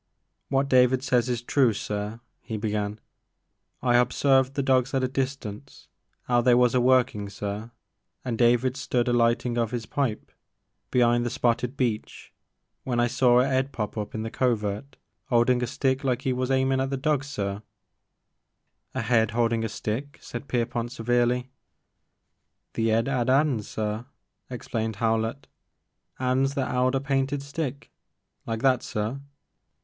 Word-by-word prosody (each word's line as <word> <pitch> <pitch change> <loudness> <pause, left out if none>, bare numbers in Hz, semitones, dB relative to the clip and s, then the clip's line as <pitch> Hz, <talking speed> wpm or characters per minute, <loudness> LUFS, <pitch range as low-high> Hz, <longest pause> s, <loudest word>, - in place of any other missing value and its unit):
" - - -52
What 135 0 +1
David 130 -1 +4
says 125 -1 +2
is 120 -1 -2
true 125 -2 +3
sir,'* 105 +2 -4 0.2
he 110 - -5
began; 105 0 -2 0.4
" - - -50
I 120 -1 +4
h*observed 130 +2 +2
the 140 - 0
dogs 130 0 +2
at 130 - +1
a - - +2
distance 130 -2 -5 0.4
*ow 120 -1 +3
they 125 0 +5
was 125 -1 +4
a 125 - +3
workin' 125 -5 +2
sir, 105 +2 -5 0.6
and 120 -3 -1
David 120 +2 +3
stood 125 -2 -1
a 120 - +2
lightin' 120 0 +2
of 115 +1 0
's 115 -2 -4
pipe 130 -2 -2 0.6
be'ind 120 -1 +3
the 120 - -1
spotted 120 +2 0
beech 115 -5 -3 0.5
when 120 -2 -1
I 120 - +4
see 125 +1 +1
a 125 +2 +4
'ead 135 +1 -3
pop 105 -5 -4
up 105 -1 -5
in 110 - -3
the 115 - -5
covert 115 +1 -1 0.3
*oldin 125 +1 +3
a 125 - 0
stick 130 +2 0
like 125 -3 -1
*e 130 - +2
was 125 0 -2
h'aimin' 130 0 +2
at 135 - -1
the 135 - -2
dogs 145 +1 0
sir 100 -7 -3 0.7
— - - -44
A 130 - -1
head 115 -2 +3
holding 115 -1 +2
a 115 - -2
stick?" 120 +7 -4
said 140 - -8
Pierpont 120 -1 -1
severely. 120 +1 0 1.2
"The 115 0 0
*ead 115 +2 +2
'ad 130 -3 0
*ands, 135 -5 +2
sir,'* 110 +2 -3 0.4
explained 115 -3 -3
Howlett, 115 +4 -1 0.7
*ands 130 +2 +1
that 135 -3 -1
*eld 125 +1 +2
a - - +2
painted 135 0 -1
stick, 140 -1 -5 0.3
— - - -52
like 115 -1 -3
that, 130 -2 +4
sir. 110 +6 -3
125 Hz, 165 wpm, -26 LUFS, 115-130 Hz, 1.2 s, they